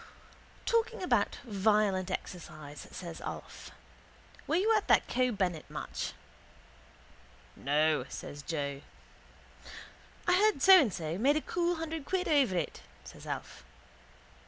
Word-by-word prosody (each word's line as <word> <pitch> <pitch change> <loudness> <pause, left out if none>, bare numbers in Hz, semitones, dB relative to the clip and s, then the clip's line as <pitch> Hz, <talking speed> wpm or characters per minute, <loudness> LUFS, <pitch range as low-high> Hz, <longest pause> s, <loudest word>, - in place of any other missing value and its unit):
—Talking 460 -3 +1
about 240 - +2
violent 205 -3 +2
exercise, 155 -5 -7
says 170 -3 -8
Alf, - - -7 0.8
were 315 - +1
you 430 +5 +3
at 425 - 0
that - - +5
Keogh 250 0 +1
Bennett 180 -5 -2
match? - - -5 1.4
—No, 150 0 +1
says 145 - -7
Joe. 140 -3 -3 1.5
—I 355 - +5
heard 415 -2 +4
So 380 -2 +10
and 245 -8 +1
So 165 +1 -4
made 280 +6 +4
a - - 0
cool 350 +2 0
hundred 320 -2 -5
quid 375 0 -1
over 270 - +3
it, 165 - -3 0.2
says - - -12
Alf. - - -6
210 Hz, 125 wpm, -31 LUFS, -, 1.5 s, So